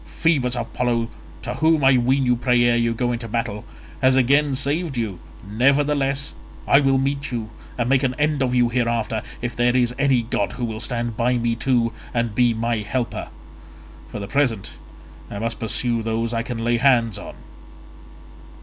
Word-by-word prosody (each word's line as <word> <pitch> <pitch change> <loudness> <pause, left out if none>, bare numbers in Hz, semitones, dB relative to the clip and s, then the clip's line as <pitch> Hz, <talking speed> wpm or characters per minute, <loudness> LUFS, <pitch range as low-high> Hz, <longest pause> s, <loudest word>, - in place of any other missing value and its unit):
Phoebus 135 -7 0
Apollo, 115 0 -1 0.3
to - - -3
whom 160 -2 +2
I 135 0 +6
ween 130 +2 +2
you 125 0 +3
pray 125 0 +2
ere 120 0 +3
you 115 0 +1
go 120 +1 0
into 115 -1 -4
battle, 115 -2 -3 0.4
has 130 0 +4
again 140 +2 +3
saved 145 +2 -1
you, 110 -6 -3 0.3
nevertheless 140 +4 +1 0.3
I 140 - +6
will 135 -2 +3
meet 140 +1 -1
you 115 -3 -4 0.3
and 120 -1 0
make 130 0 +3
an 130 -2 0
end 150 -1 +1
of 125 -1 +1
you 120 -1 +3
hereafter, 115 -2 -1 0.2
if 120 -1 -3
there 120 +1 +2
is 125 -1 +2
any 135 -4 +3
god 105 -3 -2
who 125 -1 -3
will 110 -1 -5
stand 120 0 -2
by 125 +2 +1
me 120 0 0
too 115 -1 +1 0.2
and 115 -2 0
be 120 +1 +3
my 115 +1 -1
helper. 115 +4 -3 0.8
For - - -6
the 100 -1 -5
present 125 -8 -1 0.5
I 100 - -6
must 115 +2 -3
pursue 115 +1 -1
those 115 +1 -2
I 115 - 0
can 115 -1 -5
lay 120 0 +2
hands 120 -5 +3
on." - - -9
120 Hz, 180 wpm, -22 LUFS, 115-135 Hz, 0.8 s, I